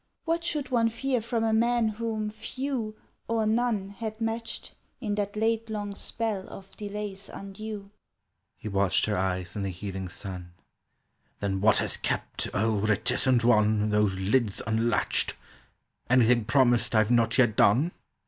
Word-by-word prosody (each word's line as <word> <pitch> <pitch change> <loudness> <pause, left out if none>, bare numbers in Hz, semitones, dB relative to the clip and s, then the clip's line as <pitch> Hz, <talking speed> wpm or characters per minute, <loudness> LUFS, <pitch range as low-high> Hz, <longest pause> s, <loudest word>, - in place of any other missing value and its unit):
What 335 0 0
should 300 -6 -1
one 230 -2 +3
fear 255 +1 -1
from 230 0 -1
a 225 -1 +2
man 235 +1 +3
whom 215 0 -3
few, 235 0 -4 0.3
Or 225 -1 +1
none, 220 -3 +1
had 220 +2 -6
matched 225 0 -3 0.3
In 215 -5 -2
that 205 0 -2
late 225 +1 0
long 205 -2 -3
spell 210 -2 -3
of 195 0 -11
delays 205 -1 -5
undue!" 200 0 -7 0.7
He - - -8
watched 100 -2 +2
her 105 - 0
eyes 90 -1 -2
in 105 - -2
the 100 - -1
heaving 95 +1 -5
sun: 90 -1 -7 0.9
"Then 95 -1 -1
what 110 +2 +5
has - - 0
kept, - - -2
O 110 +2 +1
reticent 115 +4 +2
one, 110 -2 +3
Those 105 -2 +2
lids 100 +3 +1
unlatched— 110 +1 +1 0.7
Anything 120 -2 +4
promised 120 -2 +3
I've 110 +1 +4
not 115 -1 +3
yet 120 -5 +4
done?" 130 - +4
195 Hz, 150 wpm, -28 LUFS, -, 0.9 s, what